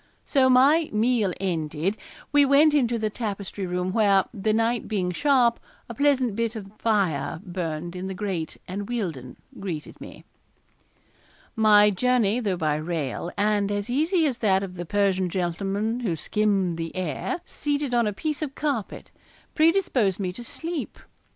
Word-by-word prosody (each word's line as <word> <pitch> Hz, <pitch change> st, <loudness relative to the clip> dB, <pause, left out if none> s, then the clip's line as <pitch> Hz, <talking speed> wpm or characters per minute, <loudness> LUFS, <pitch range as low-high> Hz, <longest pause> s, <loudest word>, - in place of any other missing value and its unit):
So, 265 Hz, -3 st, +3 dB
my 285 Hz, +6 st, +5 dB
meal 220 Hz, -2 st, +2 dB
ended, 165 Hz, 0 st, -1 dB, 0.4 s
we 290 Hz, -1 st, +5 dB
went 285 Hz, +2 st, +5 dB
into 240 Hz, -5 st, +2 dB
the 215 Hz, -1 st, -2 dB
tapestry 200 Hz, -3 st, -4 dB
room 180 Hz, +1 st, -2 dB
where, 200 Hz, -3 st, +4 dB
the 215 Hz, 0 st, 0 dB
night 230 Hz, +2 st, 0 dB
being 185 Hz, -4 st, -1 dB
sharp, 245 Hz, -, +3 dB, 0.3 s
a 235 Hz, -, -7 dB
pleasant 260 Hz, -4 st, +2 dB
bit 230 Hz, 0 st, -1 dB
of 195 Hz, -3 st, -8 dB
fire 190 Hz, -8 st, 0 dB
burned 175 Hz, -2 st, -4 dB
in 180 Hz, +1 st, -4 dB
the 190 Hz, -, -5 dB
grate, 185 Hz, -5 st, -3 dB
and 200 Hz, +3 st, -5 dB
Wealdon 165 Hz, -, -4 dB, 0.2 s
greeted 170 Hz, -6 st, -6 dB
me. -, -, -11 dB, 1.3 s
My 210 Hz, -2 st, +6 dB
journey, 235 Hz, +1 st, +2 dB
though 200 Hz, -6 st, -1 dB
by 155 Hz, -2 st, 0 dB
rail, 160 Hz, 0 st, -3 dB
and 205 Hz, -1 st, +1 dB
as 205 Hz, +3 st, -2 dB
easy 320 Hz, +6 st, +2 dB
as 260 Hz, -5 st, -1 dB
that 195 Hz, -3 st, +2 dB
of 190 Hz, -2 st, -6 dB
the 175 Hz, -1 st, -7 dB
Persian 195 Hz, -2 st, +1 dB
gentleman 195 Hz, +6 st, -2 dB
who 205 Hz, -9 st, -1 dB
skimmed 195 Hz, -2 st, 0 dB
the 165 Hz, 0 st, -5 dB
air, 185 Hz, -, -3 dB
seated 290 Hz, -3 st, -2 dB
on 235 Hz, -2 st, +3 dB
a -, -, 0 dB
piece 300 Hz, +9 st, -3 dB
of 285 Hz, -3 st, -4 dB
carpet, 280 Hz, -9 st, -3 dB, 0.4 s
predisposed 310 Hz, -, +2 dB
me 185 Hz, -2 st, -2 dB
to 240 Hz, -, -8 dB
sleep. 325 Hz, +6 st, -5 dB
205 Hz, 155 wpm, -25 LUFS, 185-245 Hz, 1.3 s, My